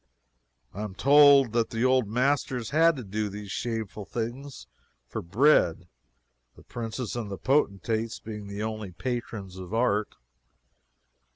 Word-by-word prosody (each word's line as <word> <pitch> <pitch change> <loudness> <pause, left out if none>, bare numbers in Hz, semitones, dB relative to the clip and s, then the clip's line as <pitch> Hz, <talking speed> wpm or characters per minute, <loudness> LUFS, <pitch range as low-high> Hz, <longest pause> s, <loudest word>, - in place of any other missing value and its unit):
I 100 - -6
am 105 -3 -5
told 140 -2 +6
that 115 -1 +1
the 115 +2 -1
old 130 -3 +3
masters 125 0 0
had 165 +2 +4
to 130 - -6
do 105 +1 -3
these 100 0 -8
shameful 110 -3 -4
things 120 +6 -6 0.4
for - - -5
bread, 90 - +3 0.7
the - - -17
princes 115 0 -5
and 115 -4 -4
potentates 110 -4 0
being 105 -2 -8
the 100 +1 -5
only 110 -4 -5
patrons 110 -4 -5
of 95 +3 -6
art. 110 -3 +1
115 Hz, 130 wpm, -27 LUFS, 105-130 Hz, 0.7 s, told